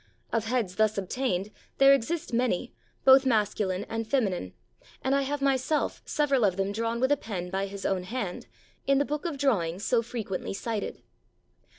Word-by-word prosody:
Of 225 Hz, -1 st, +1 dB
heads 220 Hz, -6 st, -1 dB
thus 215 Hz, -1 st, +2 dB
obtained 200 Hz, -1 st, -1 dB, 0.3 s
there 275 Hz, 0 st, +7 dB
exist 275 Hz, +2 st, -1 dB
many, 240 Hz, -1 st, 0 dB, 0.3 s
both 265 Hz, 0 st, +8 dB
masculine 205 Hz, -5 st, +1 dB
and 225 Hz, 0 st, -3 dB
feminine; 195 Hz, -, 0 dB, 0.5 s
and 265 Hz, -, +1 dB
I 275 Hz, -, +3 dB
have 275 Hz, +1 st, -2 dB
myself 275 Hz, +2 st, +1 dB
several 280 Hz, -5 st, +1 dB
of 190 Hz, -3 st, +2 dB
them 195 Hz, +1 st, 0 dB
drawn 230 Hz, +2 st, -1 dB
with 260 Hz, +3 st, +2 dB
a 290 Hz, -, +4 dB
pen 180 Hz, -7 st, -5 dB
by 195 Hz, +1 st, -1 dB
his 195 Hz, 0 st, -7 dB
own 185 Hz, -2 st, 0 dB
hand, 205 Hz, -4 st, -4 dB, 0.4 s
in 275 Hz, 0 st, +4 dB
the 285 Hz, -, +2 dB
book 300 Hz, +4 st, -3 dB
of 330 Hz, -5 st, -2 dB
drawings 200 Hz, -9 st, 0 dB
so 240 Hz, -2 st, +3 dB
frequently 220 Hz, -5 st, -4 dB
cited. 220 Hz, 0 st, -4 dB
230 Hz, 175 wpm, -28 LUFS, 195-270 Hz, 0.5 s, both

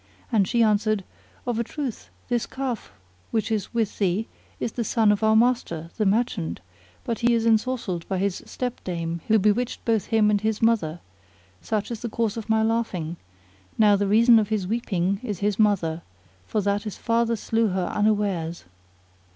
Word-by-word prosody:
and 205 Hz, -5 st, +3 dB
she 235 Hz, +2 st, +3 dB
answered, 215 Hz, -1 st, +2 dB, 0.4 s
Of 240 Hz, -2 st, -1 dB
a -, -, +1 dB
truth 265 Hz, -1 st, -5 dB, 0.2 s
this 240 Hz, -2 st, 0 dB
calf 260 Hz, -3 st, -4 dB, 0.4 s
which 225 Hz, 0 st, -1 dB
is 215 Hz, -3 st, -1 dB
with 225 Hz, -3 st, -1 dB
thee 195 Hz, +2 st, +1 dB, 0.3 s
is 230 Hz, -, -2 dB
the 235 Hz, -, -2 dB
son 220 Hz, -1 st, +3 dB
of 205 Hz, -, 0 dB
our 220 Hz, 0 st, +4 dB
master, 220 Hz, -9 st, +1 dB
the 215 Hz, -3 st, +2 dB
merchant; 195 Hz, -, 0 dB, 0.4 s
but 230 Hz, -, -3 dB
he 235 Hz, 0 st, +3 dB
is 230 Hz, -1 st, 0 dB
ensorcelled 220 Hz, -6 st, 0 dB
by 190 Hz, -, -1 dB
his 195 Hz, 0 st, -1 dB
stepdame 170 Hz, -9 st, -4 dB
who 220 Hz, -, +5 dB
bewitched 215 Hz, +5 st, 0 dB
both 225 Hz, -4 st, +1 dB
him 215 Hz, -2 st, +3 dB
and 205 Hz, -1 st, +1 dB
his 220 Hz, 0 st, 0 dB
mother: 190 Hz, -8 st, +1 dB, 0.6 s
such 215 Hz, +1 st, -2 dB
is 230 Hz, -, -4 dB
the 235 Hz, -, -4 dB
cause 220 Hz, -1 st, -1 dB
of 225 Hz, -1 st, -6 dB
my 220 Hz, 0 st, +3 dB
laughing; 205 Hz, -8 st, -1 dB, 0.6 s
now 210 Hz, -2 st, +6 dB
the 200 Hz, 0 st, 0 dB
reason 230 Hz, +3 st, +6 dB
of 210 Hz, -1 st, -1 dB
his 215 Hz, -4 st, 0 dB
weeping 195 Hz, -3 st, -1 dB
is 210 Hz, -6 st, -4 dB
his 205 Hz, 0 st, 0 dB
mother, 175 Hz, -6 st, +2 dB, 0.5 s
for 215 Hz, -, 0 dB
that 200 Hz, +1 st, 0 dB
his 210 Hz, -2 st, -6 dB
father 230 Hz, 0 st, +1 dB
slew 225 Hz, +1 st, 0 dB
her 185 Hz, -2 st, -1 dB
unawares. 200 Hz, -, 0 dB
215 Hz, 175 wpm, -25 LUFS, 195-230 Hz, 0.6 s, now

